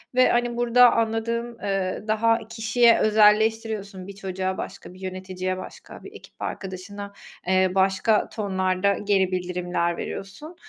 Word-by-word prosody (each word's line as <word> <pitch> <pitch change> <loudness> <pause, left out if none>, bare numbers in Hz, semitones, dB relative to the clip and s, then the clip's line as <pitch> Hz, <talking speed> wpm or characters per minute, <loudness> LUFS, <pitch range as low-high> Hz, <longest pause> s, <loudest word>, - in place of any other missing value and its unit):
ve, 255 0 +5
hani, 240 0 0
burada 240 0 +5
anladığım, 230 +1 -2
eee, 195 -1 -2
daha 225 +1 +1
kişiye 225 +1 +3
özelleştiriyorsun 215 -2 +2
bir 200 - -9
çocuğa, 190 -1 -3
başka - - -8
bir 185 - -15
yöneticiye, 185 0 -4
başka 185 - -11
bir - - -10
ekip - - -15
arkadaşına, 200 +2 -6 0.3
eee, 185 0 +3
başka 190 +3 +2
tonlarda 190 -1 0
geri 195 -2 +2
bildirimler 175 -1 -2
veriyorsun. 295 - -7
200 Hz, 130 wpm, -24 LUFS, 185-225 Hz, 0.3 s, ve